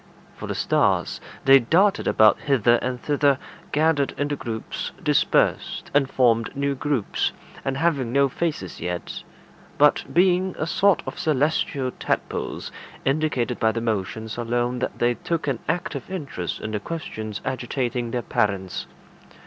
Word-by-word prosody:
For - - -7
the - - -3
stars, - - +1 0.2
they 135 0 +8
darted 190 - +3
about 110 -1 +5
hither 120 -4 +3
and 125 0 -3
thither, 145 0 +2 0.3
gathered 150 -2 +2
into 145 0 -1
groups, 115 -5 -5
dispersed, - - +1
and 140 -2 +3
formed 115 -1 +2
new 140 0 +1
groups, 135 -5 -1 0.3
and 135 0 -1
having 140 -6 +1
no 140 +2 +4
faces 140 - -3
yet, 90 -1 -4 0.6
but 150 0 +5
being 185 +1 +3
a 155 - -1
sort 195 +3 +3
of - - -6
celestial 145 -3 +1
tadpoles, - - -2 0.3
indicated 135 -4 0
by 110 - +3
their 115 0 -3
motions 110 +1 -3
alone 120 +1 -1
that - - -3
they 120 0 +2
took 165 +8 -3
an 135 -5 0
active 165 -5 -2
interest 140 - -4
in 110 - -4
the 105 - -1
questions 110 -7 -5
agitating 125 -1 -2
their 120 +1 -2
parents. 100 -4 -1
130 Hz, 140 wpm, -24 LUFS, 115-150 Hz, 0.6 s, they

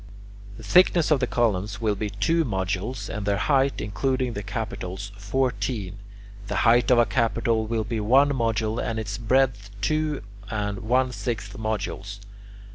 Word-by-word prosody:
The - - -11
thickness 175 -3 +4
of 150 - +4
the 125 - 0
columns 105 -4 0
will 110 -2 +1
be 105 +1 -3
two 165 +12 +1
modules, 95 - -2
and 105 -2 -4
their 100 0 +1
height, 135 +4 +2
including 130 +4 -1
the 100 - -4
capitals, 100 -2 -5
fourteen. 105 -2 -2 0.5
The - - -3
height 120 +1 +5
of 125 - +5
a 120 - +6
capital 115 -2 0
will 115 -1 0
be 115 +1 -3
one 130 +7 +4
module, 115 -4 0
and 115 -1 -2
its 105 -1 -4
breadth 120 -4 +1
two 155 +3 0 0.3
and 105 -2 -2
one 125 +3 +1
sixth 105 -2 -4
modules. 105 -2 -4
110 Hz, 155 wpm, -25 LUFS, 100-130 Hz, 0.5 s, a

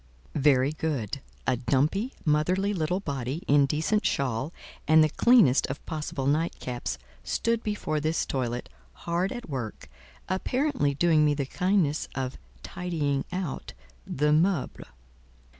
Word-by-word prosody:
Very 140 -1 +3
good. 140 -6 -3 0.2
A 130 - +2
dumpy, 145 - +1
motherly 180 +7 +2
little 180 0 0
body, 140 -1 -3
in 140 -1 +5
decent 160 +9 +1
shawl 135 +2 0 0.4
and 155 +1 +7
the 155 - +3
cleanest 225 - +5
of 130 - -6
possible 150 -4 -4
nightcaps, 140 -4 -1 0.3
stood 230 -1 0
before 210 -8 -2
this 155 +2 0
toilet, 125 -2 -2 0.4
hard 175 +3 0
at 240 -1 -6
work 120 - -5 0.4
apparently 190 - 0
doing 160 0 +4
me 150 -1 +3
the 140 -1 -1
kindness 180 -1 +1
of 130 - -3 0.2
"tidying 150 -6 -2
out" 180 -5 -4 0.3
the 150 +2 +1
"meuble." 165 -1 +1
150 Hz, 125 wpm, -27 LUFS, 135-180 Hz, 0.4 s, and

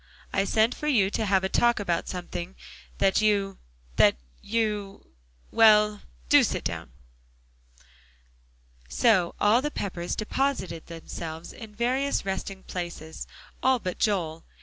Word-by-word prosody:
I 195 0 +2
sent 220 +4 +2
for 300 - -5
you 210 -9 +3
to 220 0 -1
have 190 -1 +3
a - - +2
talk 240 +4 +2
about 175 -5 -1
something 180 0 -5 0.4
that 195 +2 +3
you 200 -2 +1 0.4
that - - +6 0.3
you 210 - -2 0.4
well, 210 -2 +5 0.3
do - - +6
sit - - -1
down." - - -4 2.0
So 190 - +3
all 215 +4 +4
the 295 - -1
Peppers 180 -9 -4
deposited 215 - -2
themselves 165 0 -7
in 220 -2 -11
various 255 +2 0
resting 190 0 -4
places; 170 -3 -6 0.3
all 260 0 +4
but 185 -6 -5
Joel. 165 -6 0
200 Hz, 125 wpm, -27 LUFS, 180-225 Hz, 2.0 s, that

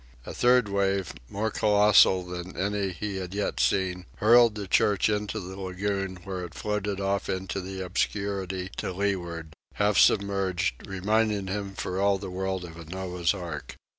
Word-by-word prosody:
A - - -6
third 125 -2 +4
wave, 100 -2 0 0.2
more 110 +2 -2
colossal 105 -3 +5
than 90 +1 -7
any 100 0 0
he 100 +2 -4
had 95 0 -5
yet 100 -10 -1
seen, 90 +7 +1
hurled 115 0 +6
the 100 -2 -5
church 100 +2 +3
into 105 +1 -1
the 95 0 -8
lagoon, 95 0 -2
where 95 -1 -4
it 85 -4 -8
floated 105 +4 -2
off 100 0 -1
into 95 +1 -2
the 95 +1 -6
obscurity 95 0 -2
to - - -3
leeward, 85 -5 -2 0.2
half 105 0 +3
submerged, 100 - +2
reminding 105 +1 +1
him 100 0 -4
for 95 0 -3
all 100 0 +3
the 95 -1 -7
world 95 0 -2
of 80 -1 -11
a 85 - -9
Noah's 90 +1 -1
ark. 85 -6 -6
95 Hz, 165 wpm, -27 LUFS, 90-100 Hz, 0.2 s, hurled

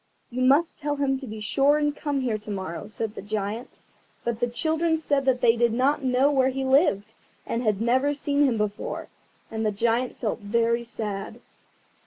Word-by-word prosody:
"You 250 +2 -3
must 280 +6 +3
tell 295 -1 -1
him 270 -2 0
to 265 - -8
be 215 0 -7
sure 275 +7 +3
and 295 -1 0
come 285 -2 -2
here 230 -4 -1
to 215 - -11
morrow," 190 -2 -5
said 215 0 -4
the - - -7
Giant. 210 +3 -4 0.4
But 235 -2 -2
the 245 - +1
children 320 +6 0
said 285 -3 0
that 255 -2 +2
they 230 -1 +5
did 235 0 +2
not 270 +4 +1
know 260 +2 +3
where 265 -2 +3
he 265 0 -3
lived, 260 - +2 0.3
and 230 - -2
had 215 -4 +1
never 260 +5 +2
seen 285 0 +2
him 245 -4 +1
before; 210 -1 -3 0.4
and 220 0 -2
the 215 - +1
Giant 235 +4 0
felt 220 -1 -2
very 230 +3 +1
sad. 210 -4 -5
245 Hz, 195 wpm, -25 LUFS, 220-280 Hz, 0.4 s, they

